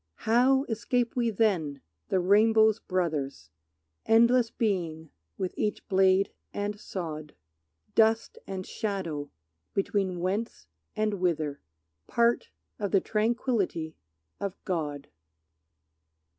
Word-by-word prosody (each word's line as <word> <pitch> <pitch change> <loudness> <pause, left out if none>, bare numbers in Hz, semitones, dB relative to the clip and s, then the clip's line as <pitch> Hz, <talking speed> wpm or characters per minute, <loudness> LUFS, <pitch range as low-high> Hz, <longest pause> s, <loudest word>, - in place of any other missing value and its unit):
How 255 +4 +4
escape 235 0 -1
we 240 -2 +2
then, 180 -10 +1 0.3
the 190 - +2
rainbow's 220 +3 +5
brothers, 150 - -2 0.6
Endless 235 +1 +5
being 170 -9 -2 0.3
with 185 -1 -2
each 210 - -2
blade 190 0 +4 0.2
and 205 0 -3
sod? 155 -7 -6 0.6
Dust 225 0 +3
and 190 -1 -4
shadow 170 -9 -3 0.5
between 195 -2 0
whence 185 - -2 0.3
and 215 0 +1
whither, 155 -5 0 0.5
Part 235 0 +2 0.3
of 205 -1 -1
the 195 - +4
tranquillity 215 - 0 0.4
of 200 -1 -4
God. 150 -6 -2
195 Hz, 100 wpm, -28 LUFS, 170-225 Hz, 0.6 s, rainbow's